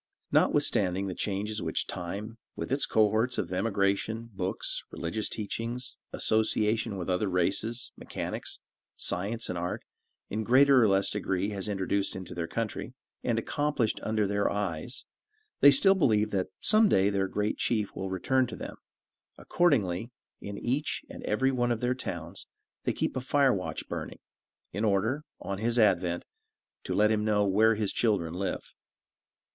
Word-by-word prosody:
Not - - +4
withstanding 95 0 +2
the 95 - -3
changes 105 +3 -2
which - - -1
time, 105 +6 -6 0.2
with - - -5
its 135 0 +2
cohorts 110 +3 +2
of - - -2
emigration, 100 +3 0
books, 95 -1 -2
religious 105 +6 -3
teachings, 115 +4 -4 0.2
association 110 -1 +1
with 90 - -4
other 95 +2 0
races, 100 +7 -1
mechanics, - - -5 0.4
science 110 +6 -2
and 90 -1 -3
art, 90 +1 -3 0.4
in 110 +2 -2
greater 130 +3 +6
or 110 - +5
less 95 0 +3
degree, 95 -1 -1
has 100 -1 -3
introduced 100 0 -1
into 95 -2 -7
their 85 -1 -3
country, 115 +5 -4 0.3
and 120 -2 +1
accomplished 140 -1 0
under 110 -1 0
their 100 +1 +1
eyes, 100 +3 -3 0.5
they 140 - +9
still 195 +8 +7
believe 110 - +2
that 95 -2 0
some 215 0 +5
day 95 +2 +3
their 95 -1 +1
great 105 +2 -1
chief 110 -4 0
will 95 - -4
return 125 +8 +1
to - - -7
them; - - -7 0.6
accordingly, 115 - +1 0.3
in 100 0 -7
each 135 +5 -1
and - - -8
every 130 +6 +2
one 120 -2 +1
of 115 - 0
their 125 +1 +1
towns, 85 -7 -6 0.4
they - - +2
keep - - -2
a - - 0 0.3
watch 95 -5 -2
fire - - -31
burning, - - -5 0.5
in 105 - -2
order, 110 +8 +1 0.2
on 100 0 -4
his 115 +2 0
advent, 90 -5 +2 0.6
to - - -3
let 105 +1 +4
him 105 -1 +1
know 105 -1 +2
where 110 +3 +4
his 105 -2 0
children 100 -8 +1
live. 95 +1 -4
105 Hz, 160 wpm, -29 LUFS, 95-115 Hz, 0.6 s, they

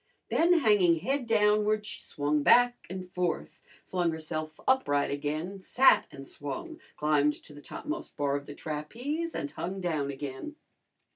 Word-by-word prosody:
Then 345 +1 +4
hanging 200 - +4
head 270 - -1
downward 210 -1 +3
she - - -6
swung 145 +1 -1
back 245 +9 +4
and 185 0 -6
forth; 180 -1 -3 0.3
flung 180 -2 0
herself 155 -1 -5
upright 145 - +2
again, 155 +7 -3
sat 255 +7 +4
and 135 0 -10
swung; 320 - -6 0.2
climbed 150 -1 +3
to 150 - -14
the 145 - -12
topmost 310 - -6
bar 140 -1 +1
of 140 0 -4
the 145 - -8
trapeze 245 - -4
and 145 - -3
hung 190 +3 -4
down 155 -6 -1
again. 140 - -6
175 Hz, 150 wpm, -29 LUFS, 145-235 Hz, 0.3 s, Then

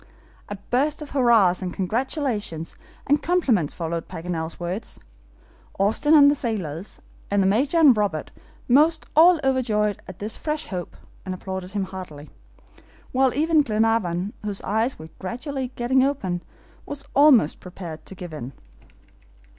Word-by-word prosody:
A 205 - -4
burst 270 +10 -1
of 290 - -11
hurrahs, 230 -9 +4
and 185 -1 -3
congratulations, 210 - -2 0.3
and 290 +2 +2
compliments 260 - +1
followed 165 -1 -4
Paganel's 165 -1 -5
words. 180 +5 -5 0.8
Austin 225 +10 +3
and 285 -2 +8
the 285 - +5
sailors, 200 - -4 0.3
and 200 -1 +2
the - - +1
Major 260 - +2
and 295 -7 +7
Robert, 200 -8 -1 0.4
most 310 +5 +4
all 335 +2 +7
overjoyed 220 -6 +1
at 185 - -9
this 215 +2 -3
fresh 305 0 -3
hope, 180 -3 -6 0.3
applauded 190 0 -5
him 200 -2 -1
heartily; 170 -6 -9 0.8
while 260 0 +3
even 315 +1 +3
Glenarvan, 215 -6 0
whose 205 -2 -3
eyes 220 +5 0
were 160 0 -10
gradually 260 +6 -4
getting 255 +2 +2
open, 195 -11 -1 0.4
was 285 -1 -7
almost 275 - +5
prepared 175 -4 -9
to 190 - -9
give 175 -3 -8
in. 135 -3 -7
210 Hz, 140 wpm, -23 LUFS, 180-270 Hz, 0.8 s, and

